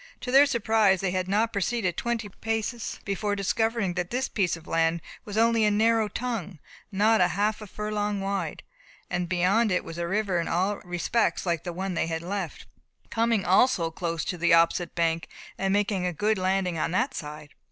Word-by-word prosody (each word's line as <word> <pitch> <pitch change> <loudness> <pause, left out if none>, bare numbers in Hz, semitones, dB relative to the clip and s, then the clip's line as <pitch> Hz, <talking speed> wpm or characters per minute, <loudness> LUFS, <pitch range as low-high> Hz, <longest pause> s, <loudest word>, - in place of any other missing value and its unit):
To 250 - -4
their 275 +2 +7
surprise 220 -6 +3
they 190 -1 -1
had 185 0 -1
not 220 +4 +1
proceeded 200 -3 0
twenty 235 -1 -2
paces 225 +3 -3
before 205 +1 -1
discovering 210 0 0
that 175 0 -3
this 255 +2 -1
piece 185 -5 0
of 165 - -15
land 165 0 +1 0.3
was 210 0 -5
only 230 0 +4
a 210 - +4
narrow 220 +1 +3
tongue, 210 -5 -4 0.3
not 215 +2 +3
a 180 - +5
half 205 +5 0
furlong 210 0 -2
wide, 195 0 -3 0.5
and 175 0 0
that - - -12
beyond 190 +5 +2
it 180 - +1
was 165 +1 -8
a 170 - -1
river 195 -1 0
in 170 - -2
all 190 +4 0
respects 180 +7 -1
like 170 -3 -1
the 175 - -4
one 190 +2 -3
they 165 - 0
had 165 0 -3
left, 190 -2 -4 0.5
coming 230 -3 +1
also 185 -3 +3
close 165 0 -3
to 180 - -4
the 170 0 +5
opposite 170 +1 +2
bank, 165 -1 0 0.3
and 195 0 -1
making 200 -2 +1
a 180 - -2
good 210 +5 0
landing 185 -2 0
on - - 0
that 240 +10 0
side. 150 - -8
195 Hz, 195 wpm, -26 LUFS, 175-220 Hz, 0.5 s, their